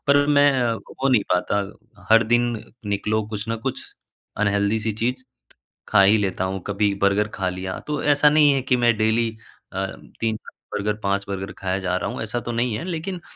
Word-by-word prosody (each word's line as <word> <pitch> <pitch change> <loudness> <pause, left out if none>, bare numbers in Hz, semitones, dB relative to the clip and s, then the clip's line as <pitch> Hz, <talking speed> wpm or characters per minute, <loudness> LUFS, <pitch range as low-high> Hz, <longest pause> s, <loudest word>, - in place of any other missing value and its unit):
पर 145 0 +5
मैं 145 -1 +5 0.2
हो 135 +4 -3
नहीं 125 -6 +4
पाता 90 +3 +1 0.5
हर 115 +1 +7
दिन 120 0 +4 0.4
निकलो 105 +2 0
कुछ 105 0 -5
न 115 - -1
कुछ 135 -1 -2 0.6
अनहेल्दी 100 +1 +1
सी 110 0 -1
चीज़ 125 +4 -2 0.6
खा 100 - +5
ही 100 +3 +6
लेता 95 -2 -1
हूँ, 95 0 -3
कभी 100 0 +1
बर्गर 100 +2 +3
खा 95 -1 -1
लिया, 95 +1 -4
तो 150 -1 -3
ऐसा 145 0 +5
नहीं 150 -1 +5
है 135 -2 +1
कि 130 -1 +2
मैं 120 -2 +3
डेली 110 +1 +2 0.4
अ, 95 +1 -1 0.3
3 110 -1 0 0.4
बर्गर, 105 +1 0
5 100 0 0
बर्गर 95 -1 -4
खाए 95 0 -2
जा 90 -1 -1
रहा 90 - -2
हूँ, - - -5
ऐसा 115 +2 -3
तो 120 - -5
नहीं 120 -1 0
है - - -5
लेकिन 180 +1 -4
110 Hz, 195 wpm, -23 LUFS, 100-125 Hz, 0.6 s, हर